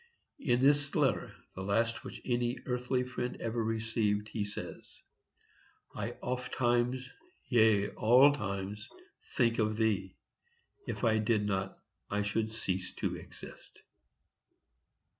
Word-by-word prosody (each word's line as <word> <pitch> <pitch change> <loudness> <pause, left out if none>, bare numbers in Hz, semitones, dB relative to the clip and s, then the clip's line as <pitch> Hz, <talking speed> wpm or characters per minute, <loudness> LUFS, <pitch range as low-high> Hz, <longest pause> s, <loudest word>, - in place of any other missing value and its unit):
In 125 - +2
this 145 0 +3
letter, - - +2 0.2
the 95 - -6
last 115 +4 0
which - - -9
any 120 0 0
earthly 125 0 0
friend 125 -1 -4
ever 115 0 -1
received, 110 -1 0
he 105 -2 -2
says: 100 - -8 0.9
I - - -3
ofttimes, 125 0 0 0.4
yea, 110 -4 +4
all 130 +6 +6
times, 100 -2 -4 0.5
think 115 -2 +3
of 110 -1 +1
thee;—if 110 - -4
I 110 -2 +4
did 105 -1 +2
not, 95 -1 -1 0.3
I 105 0 0
should 110 +2 -1
cease 95 -4 -2
to - - -2
exist. - - -11
115 Hz, 115 wpm, -32 LUFS, 105-125 Hz, 0.9 s, all